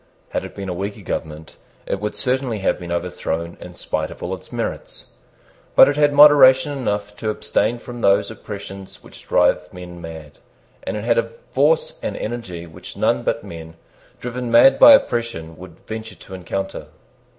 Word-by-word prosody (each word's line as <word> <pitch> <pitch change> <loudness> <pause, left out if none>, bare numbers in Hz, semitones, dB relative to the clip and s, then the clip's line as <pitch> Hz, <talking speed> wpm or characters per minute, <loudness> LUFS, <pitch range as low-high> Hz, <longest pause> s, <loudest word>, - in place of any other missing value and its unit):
Had - - -3
it - - -9
been 100 -1 -6
a 90 - -2
weaker 100 +3 -5
government, 80 -2 -6 0.3
it 100 - -2
would 105 +1 -4
certainly 130 -3 -1
have 95 - 0
been 85 -1 -7
overthrown 85 -1 -3
in 90 0 -10
spite 80 -2 -3
of - - -11
all - - -3
its - - -9
merits. - - -6 0.6
But - - +9
it 145 - +1
had 145 0 +3
moderation 145 -1 +7
enough 105 -5 -3
to 110 - -3
abstain 105 +2 0
from 120 0 -9
those 100 +1 +3
oppressions 100 -3 -9
which - - -15
drive - - +2
men 90 -1 -10
mad; 80 -3 -10 0.4
and - - -4
it 105 - -5
had 115 0 +2
a 115 - -2 0.2
force 150 +4 +1
and - - -4
energy 95 -7 -5
which 80 -1 -11
none 65 - +1
but - - -2
men 80 -1 -10 0.4
driven 125 0 -5
mad 120 +3 +6
by 290 - +10
oppression 115 - 0
would 90 -2 -14
venture 110 0 -7
to 95 - -14
encounter. 95 +1 -5
105 Hz, 175 wpm, -21 LUFS, 85-120 Hz, 0.6 s, by